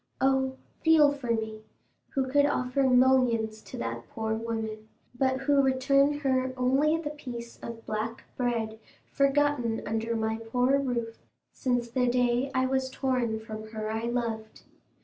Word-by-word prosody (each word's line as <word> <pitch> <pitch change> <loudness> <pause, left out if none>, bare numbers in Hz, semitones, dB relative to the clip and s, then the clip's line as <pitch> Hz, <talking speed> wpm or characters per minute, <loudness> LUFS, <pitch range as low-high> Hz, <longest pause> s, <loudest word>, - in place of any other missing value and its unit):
"Oh, 265 0 +2 0.3
feel 315 -3 +6
for 280 -4 -6
me, 220 -1 -1 0.5
who 265 -1 +1
could 285 +2 +4
offer 255 -1 0
millions 250 -4 +3
to - - -9
that 115 0 -5
poor 220 0 -2
woman, 220 -1 -4 0.3
but 260 +1 0
who 280 0 +4
return 275 +2 +3
her 260 -2 +1
only 270 +5 +3
the 310 -3 -4
piece 240 -5 -8
of 230 -1 -8
black 220 +2 -3
bread 230 -3 -1 0.3
forgotten 275 -4 +1
under 225 +2 -1
my 220 0 -1
poor 245 +4 +1
roof 235 -4 -2 0.3
since 245 -2 -1
the 250 +1 0
day 245 +1 +2
I 260 0 +3
was 265 0 0
torn 250 -4 -1
from 215 0 -8
her 215 0 -3
I 225 +1 -2
loved. 230 -2 -3
245 Hz, 150 wpm, -28 LUFS, 225-265 Hz, 0.5 s, feel